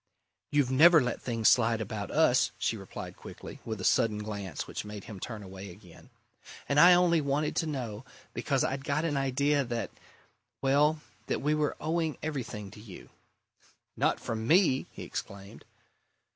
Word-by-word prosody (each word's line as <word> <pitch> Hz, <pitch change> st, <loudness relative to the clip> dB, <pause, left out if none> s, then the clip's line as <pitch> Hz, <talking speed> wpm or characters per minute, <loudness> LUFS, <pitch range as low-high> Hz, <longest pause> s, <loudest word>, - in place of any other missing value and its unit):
"You've 145 Hz, -3 st, +2 dB
never 160 Hz, +5 st, +7 dB
let 125 Hz, -3 st, -2 dB
things 115 Hz, -3 st, 0 dB
slide 115 Hz, -2 st, +4 dB
about 105 Hz, -2 st, -4 dB
us," -, -, +3 dB
she -, -, 0 dB
replied -, -, -8 dB
quickly, -, -, -10 dB
with 110 Hz, -2 st, -5 dB
a -, -, -6 dB
sudden 110 Hz, +2 st, +3 dB
glance 105 Hz, -3 st, -5 dB
which -, -, -5 dB
made 105 Hz, -1 st, -8 dB
him 105 Hz, -3 st, -9 dB
turn 110 Hz, +1 st, -6 dB
away 95 Hz, +1 st, -9 dB
again. 90 Hz, -2 st, -15 dB, 0.6 s
"And 140 Hz, +1 st, +2 dB
I 175 Hz, +3 st, +9 dB
only 175 Hz, -2 st, +3 dB
wanted 145 Hz, +2 st, -1 dB
to 165 Hz, -, +1 dB
know 120 Hz, -7 st, -4 dB, 0.3 s
because 135 Hz, -2 st, 0 dB
I'd 135 Hz, +1 st, -2 dB
got 145 Hz, +3 st, 0 dB
an 155 Hz, -3 st, -1 dB
idea 140 Hz, +1 st, +1 dB
that 120 Hz, -2 st, -4 dB, 0.7 s
well, 150 Hz, +3 st, +2 dB, 0.3 s
that -, -, -2 dB
we 150 Hz, +1 st, +2 dB
were 150 Hz, -1 st, 0 dB
owing 160 Hz, 0 st, -1 dB
everything 115 Hz, -10 st, -5 dB
to 105 Hz, -, -13 dB
you." 105 Hz, -4 st, -12 dB, 0.8 s
"Not -, -, +1 dB
from 110 Hz, 0 st, -4 dB
me!" 165 Hz, -5 st, +4 dB
he -, -, -9 dB
exclaimed. 100 Hz, 0 st, -8 dB
130 Hz, 165 wpm, -29 LUFS, 105-150 Hz, 0.8 s, I